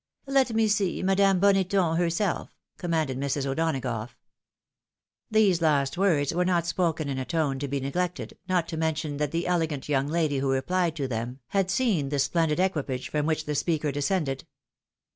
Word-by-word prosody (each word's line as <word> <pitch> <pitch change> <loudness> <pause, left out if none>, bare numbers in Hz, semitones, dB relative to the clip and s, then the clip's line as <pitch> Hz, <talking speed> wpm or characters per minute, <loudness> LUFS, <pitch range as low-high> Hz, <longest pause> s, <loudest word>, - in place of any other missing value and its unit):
" - - -59
Let 270 -4 +2
me 225 0 +3
see 205 -4 0
Madame 195 0 +3
Boneton 195 -3 +3
herself," 175 +2 -1 0.2
commanded 160 -7 -1
Mrs. 140 0 -1
O'Donagough. 135 -6 -2 1.1
These 205 -6 +3
last 145 -3 +2
words 170 -7 +2
were 180 +2 +1
not 175 -2 +1
spoken 165 -3 0
in 135 -1 -2
a - - -2
tone 145 -3 -1
to 140 - -3
be 140 0 -2
neglected, 175 +7 -3
not 180 -3 +1
to 160 - -4
mention 155 -2 -1
that 150 0 0
the 165 +3 -2
elegant 160 -6 -1
young 140 -1 +1
lady 155 -3 0
who 135 0 0
replied 170 +5 0
to 140 -4 -2
them 120 +1 -4
had 195 -2 +1
seen 190 - +1
the 145 - -1
splendid 160 +3 +1
equipage 145 -9 -1
from 150 0 0
which 155 -1 0
the 150 - -2
speaker 150 0 0
descended. 140 -1 -1
160 Hz, 175 wpm, -27 LUFS, 140-180 Hz, 1.1 s, me